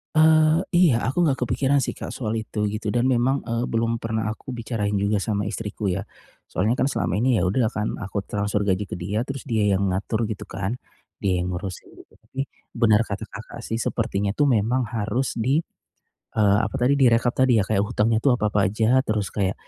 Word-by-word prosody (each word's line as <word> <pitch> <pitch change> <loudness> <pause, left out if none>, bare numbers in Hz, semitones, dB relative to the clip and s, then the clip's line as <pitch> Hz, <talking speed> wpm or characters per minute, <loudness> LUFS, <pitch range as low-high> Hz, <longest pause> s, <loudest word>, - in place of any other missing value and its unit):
Eee, 155 0 +5 0.2
iya, 170 -10 +5
aku 160 +7 +1
enggak 140 -5 +2
kepikiran 140 +3 +2
sih, 130 - -2
Kak, - - -6
soal 110 -3 -3
itu, 110 -1 -2
gitu. 105 0 -3
Dan 120 +3 +2
memang, 130 +2 +2
eee, 115 0 -1
belum 115 -1 0
pernah 110 -1 -2
aku 110 +5 -6
bicarain 115 -4 -2
juga 100 0 +1
sama 100 -2 -1
istriku 105 -1 -4
ya. 95 +1 -1 0.5
Soalnya 110 +6 +1
kan 130 - 0
selama 90 - -1
ini 120 +2 +2
ya 90 - +1
udah 110 +4 +1
kan, 105 -1 -2
aku 100 +1 -4
transfer 105 0 -1
gaji 95 +1 +1
ke - - -4
dia, 100 +6 -1
terus 135 +1 -7
dia 110 -4 +1
yang 100 0 +1
ngatur 105 +4 -1
gitu 105 -1 -5
kan, 100 +2 -4 0.5
dia 95 -2 +2
yang 90 - -2
ngurusin. 95 0 -6 0.2
Tapi, 135 - -6 0.3
benar 115 -2 +3
kata 100 -1 -4
Kakak - - -9
sih 115 - -3
sepertinya 105 -4 -1
tuh 145 -2 +3
memang 120 +3 +2
harus 120 +4 -1
di, 135 +8 +2 0.7
eee, 105 -2 +4
apa - - -5
tadi 135 +2 +2
direkap 120 -2 +4
tadi 125 -4 +4
ya - - 0
kayak 100 -2 +1
hutangnya 110 0 +1
itu 130 +3 +3
apa-apa 105 -4 +1
aja, 110 +6 +2
terus 105 -3 -1
kayak, 100 -2 0
110 Hz, 200 wpm, -24 LUFS, 100-125 Hz, 0.7 s, Eee